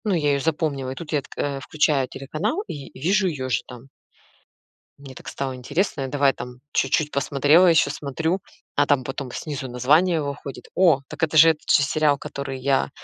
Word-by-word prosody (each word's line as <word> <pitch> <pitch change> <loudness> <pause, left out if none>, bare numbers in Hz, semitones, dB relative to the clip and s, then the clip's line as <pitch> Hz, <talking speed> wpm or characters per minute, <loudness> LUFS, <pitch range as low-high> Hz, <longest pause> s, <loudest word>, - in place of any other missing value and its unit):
Ну, 205 -3 +1
я 150 -3 +1
ее 140 - +1
запомнила, 145 -3 -1
и - - -6
тут 160 +2 -8
я 150 -2 +1
тк - - -16
э, 140 -1 -2
включаю 140 -1 +1
телеканал 160 - -3
и 140 -3 -7
вижу 190 +6 +2
ее 135 -7 -3
же 120 -1 +1
там. 125 +1 -11 1.1
Мне 135 -2 -12
так - - -12
стало 135 -2 -4
интересно, 140 +6 -2
я 135 - -2
давай 140 0 +2
там 125 0 -9
чуть-чуть 150 +3 +1
посмотрела 145 +6 +4
еще, 165 -3 +4
смотрю, 160 +5 -2 0.4
а 145 - +3
там 145 -2 +2
потом 135 0 -5
снизу 140 -1 -5
название 155 +8 +3
выходит. 140 -1 -6
О, 170 -7 +4
так 160 +2 -6
это 155 0 +1
же 165 +2 +9
этот 155 -2 -2
же - - +5
сериал, 150 0 +2
который 140 -2 -6
я, 135 +1 +1
145 Hz, 195 wpm, -23 LUFS, 135-160 Hz, 1.1 s, же